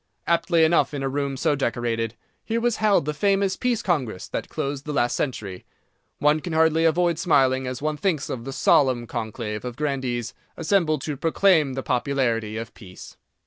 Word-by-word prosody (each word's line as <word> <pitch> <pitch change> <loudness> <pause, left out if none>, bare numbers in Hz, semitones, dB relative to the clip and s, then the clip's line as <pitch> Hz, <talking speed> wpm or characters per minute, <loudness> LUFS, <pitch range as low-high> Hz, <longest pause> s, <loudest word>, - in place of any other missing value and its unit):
Aptly 170 0 +2
enough 160 -2 +3
in 135 - -3
a - - 0
room 140 0 -2
so 145 - +1
decorated, 120 -3 -2 0.3
here 230 +1 -1
was 240 -1 0
held 210 -8 +3
the 150 - -1
famous 195 +3 +1
Peace 245 -3 -1
Congress 130 - -1
that - - -5
closed 140 0 -4
the 150 - -4
last 120 -3 +1
century. 105 -9 -4 0.5
One 150 +1 +3
can 170 +1 -6
hardly 160 0 +3
avoid 170 0 +2
smiling 130 -7 +2
as 130 +2 -5
one 155 0 -1
thinks 160 -5 -1
of 115 - -5
the 135 - -6
solemn 130 -2 +3
conclave 110 -2 -5
of 125 -1 -5
grandees 130 -5 -2 0.2
assembled 160 -4 +1
to 150 -3 -4
proclaim 165 -2 +3
the 135 0 -4
popularity 120 -4 0
of 115 +1 -6
Peace. 95 -5 -12
140 Hz, 180 wpm, -24 LUFS, 120-165 Hz, 0.5 s, enough